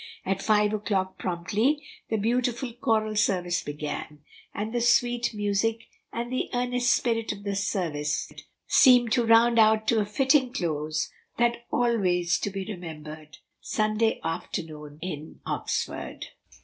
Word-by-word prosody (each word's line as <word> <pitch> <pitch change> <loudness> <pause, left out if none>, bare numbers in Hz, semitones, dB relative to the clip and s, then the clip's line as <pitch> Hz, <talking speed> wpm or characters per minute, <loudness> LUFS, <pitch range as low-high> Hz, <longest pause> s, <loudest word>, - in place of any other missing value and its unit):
At 195 +1 -1
five 210 -1 +3
o'clock 195 -3 -1
promptly 215 - 0 0.2
the 220 - +1
beautiful 240 +3 0
choral 220 -4 0
service 180 -4 +1
began, 150 0 -6 0.3
and 215 +2 -4
the 240 - 0
sweet 240 0 +3
music 210 +1 0 0.3
and 240 +2 -4
the 255 - -1
earnest 245 0 +1
spirit 230 -2 +1
of 200 -1 -8
the 200 -1 -2
service 165 -7 -1 0.3
seemed 245 -3 +6
to 240 0 +3
round 230 +1 +5
out 220 0 +5
to 230 - +3
a 210 - +1
fitting 265 +3 +2
close 155 - -2 0.3
that 235 0 +1
always 185 -8 +1
to - - -2
be 195 -1 -5
remembered 155 -5 -8 0.2
Sunday 215 +1 0
afternoon 150 -2 -5
in 155 -4 -6
Oxford. - - -3
215 Hz, 135 wpm, -27 LUFS, 175-235 Hz, 0.3 s, seemed